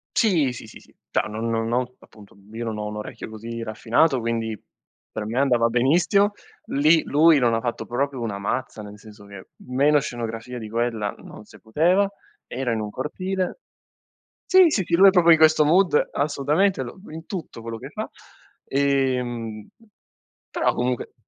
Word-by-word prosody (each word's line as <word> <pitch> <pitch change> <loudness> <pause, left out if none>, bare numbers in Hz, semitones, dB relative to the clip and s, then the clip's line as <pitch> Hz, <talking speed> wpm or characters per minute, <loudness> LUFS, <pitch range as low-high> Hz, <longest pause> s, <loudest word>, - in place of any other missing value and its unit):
Sì, 170 - +2
sì, 115 - -10
sì, 110 - -13
sì. - - -23 0.2
Cioè - - +1
non 110 +2 -4
non 115 0 -1
ho 125 0 -1
appunto 105 -2 -18 0.2
io 115 +1 -5
non 110 -2 -4
ho 105 - -4
un 105 0 -6
orecchio 105 - -7
così 115 +1 -6
raffinato, 120 +6 +1
quindi 115 -1 -2 0.6
per 110 - -5
me 115 +4 -2
andava 125 -4 +3
benissimo. 175 - +2 0.3
Lì 155 +3 +3
lui 155 +1 +4
non 120 -3 +2
ha - - 0
fatto 120 +1 -4
proprio 135 +1 -2
una 110 -4 -3
mazza, 110 +2 -4
nel 105 0 -11
senso 105 -1 -15
che 100 -2 -12 0.2
meno 140 +4 +3
scenografia 120 -3 -6
di 110 -2 -8
quella 115 -2 -1
non - - -13
se - - -17
poteva, 175 - +2 0.4
era 125 -1 -3
in 110 - -2
un 105 -1 -5
cortile 185 - -3 0.9
sì, 375 0 +8
sì, 230 - +1
lui 195 +2 +8
è - - +8
proprio 175 -3 +5
di 165 - +7
questo 155 -1 +5
mood, 170 +1 +3
assolutamente 150 +4 0
lo 120 +9 -10
in 160 +1 -9
tutto 170 - -7
quello 115 0 -6
che - - -9
fa. - - -6 0.6
Ehm, 125 -5 -1 0.8
però - - 0
comunque 125 0 -2
125 Hz, 170 wpm, -23 LUFS, 115-155 Hz, 0.9 s, sì